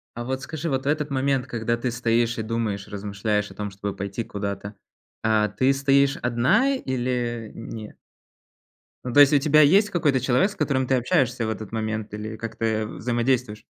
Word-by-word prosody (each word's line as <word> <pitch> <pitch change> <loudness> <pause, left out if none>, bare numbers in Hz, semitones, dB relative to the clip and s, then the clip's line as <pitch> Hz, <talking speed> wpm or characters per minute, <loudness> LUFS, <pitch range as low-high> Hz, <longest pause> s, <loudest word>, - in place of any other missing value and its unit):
А 120 - -4
вот 130 +2 -3
скажи, 160 +2 -4
вот 135 -1 -1
в - - -5
этот 150 0 0
момент, 135 -1 0
когда 115 0 -1
ты 120 +1 -2
стоишь 120 0 +1
и 110 - -2
думаешь, 110 -3 -2
размышляешь 105 +1 -2
о - - -13
том, 105 -1 -4
чтобы 100 0 -5
пойти 100 +4 -4
куда-то, 100 0 -5 0.5
а 110 -1 +3
ты 130 +6 +2
стоишь 140 0 +3
одна 125 - +2
или 120 - -2
н 115 - -8
нет? 110 -2 -8 1.1
Ну, 125 - -3
то 145 - +4
есть 145 +1 +8
у 145 - +6
тебя 155 +1 +5
есть 195 +8 +5
какой-то 145 -8 +1
человек, 130 +10 +2
с - - -11
которым 130 -3 0
ты 130 - +3
общаешься 120 -1 +1
в - - -2
этот 110 0 -6
момент 110 -1 -3
или 110 +1 -5
как-то, 115 0 -4
э, 110 -1 0
взаимодействуешь? 120 -1 -1
120 Hz, 190 wpm, -24 LUFS, 110-135 Hz, 1.1 s, есть